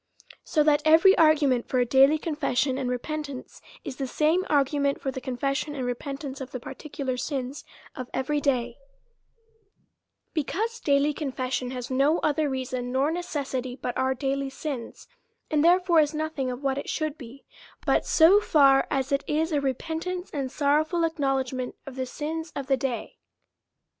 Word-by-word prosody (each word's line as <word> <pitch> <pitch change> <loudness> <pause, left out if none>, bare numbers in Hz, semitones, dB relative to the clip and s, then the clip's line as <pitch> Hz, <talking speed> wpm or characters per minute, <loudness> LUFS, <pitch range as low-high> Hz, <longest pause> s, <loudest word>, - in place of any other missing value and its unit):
So 305 - +2
that 295 0 +3
every 330 +5 +6
argument 295 -6 +3
for 255 - -1
a 245 - +3
daily 270 +5 +5
confession 295 -4 0
and 255 -2 -2
repentance 280 +2 -5 0.2
is 265 - -6
the 270 - -3
same 315 +7 +2
argument 280 -1 +1
for 270 - -3
the 260 - -6
confession 275 +3 -2
and 260 -3 -3
repent 275 +4 -4
ance 270 -1 -6
of 265 - -6
the 255 - -6
particular 270 -1 -5
sins 265 +1 -4 0.3
of 255 -1 -6
every 290 +3 -1
day: 245 -4 0 1.6
because 425 +9 -2
daily 285 +1 +2
confession 260 -3 -3
has 250 0 -6
no 275 +5 +3
other 305 0 +1
reason 255 -1 -3
or 280 +4 +2
necessity 275 -7 -3
but 250 -1 -4
our 260 0 +1
daily 275 +1 -2
sins; 270 -3 -6 0.4
and 305 -1 +3
therefore 350 0 +5
is 300 0 +2
notliing 305 -4 -2
of 250 +3 -7
what 270 0 0
it - - -7
should 310 -2 -2
be, 265 -2 -12 0.4
but - - +3
so 355 +5 +6
far 275 -8 +4
as 270 -2 -1
it 280 0 +1
is 320 +2 0
repentance 320 +6 -2
and 275 -3 -3
sorrowful 310 +4 +1
ac 325 - -2
knowledgment 265 -2 -1
of 275 - -9
the 260 -1 -3
sins 320 +4 -5
of 280 - -4
the 270 0 +2
day. 250 -2 -4
280 Hz, 165 wpm, -26 LUFS, 260-310 Hz, 1.6 s, every